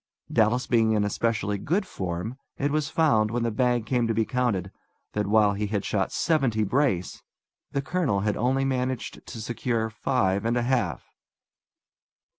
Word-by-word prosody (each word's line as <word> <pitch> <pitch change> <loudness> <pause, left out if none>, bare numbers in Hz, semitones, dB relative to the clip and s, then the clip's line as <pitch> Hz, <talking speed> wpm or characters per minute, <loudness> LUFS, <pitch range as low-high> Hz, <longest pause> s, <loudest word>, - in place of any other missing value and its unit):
Dallas 115 +3 +3
being 115 -2 +3
in 105 -1 +2
especially 105 -1 -1
good 190 - 0
form, 95 +7 -4 0.2
it 140 +1 0
was 155 0 0
found, 145 -10 +3
when 120 +1 -1
the 115 - 0
bag 120 0 +1
came 120 -2 +1
to 115 - 0
be 110 0 +2
counted, 110 -8 -1 0.4
that, 105 -1 -1
while 105 -1 +4
he 105 +1 -2
had 100 -1 -2
shot 100 -3 0
seventy 135 -10 +1
brace, 105 -5 0 0.5
the 140 - -1
colonel 140 - 0
had 105 0 0
only 130 +3 +1
managed 130 -1 -2
to 115 - -7
secure 115 0 -2
five 100 -5 0
and 115 +2 +1
a 120 - +1
half! 120 -8 0
115 Hz, 165 wpm, -26 LUFS, 105-130 Hz, 0.5 s, while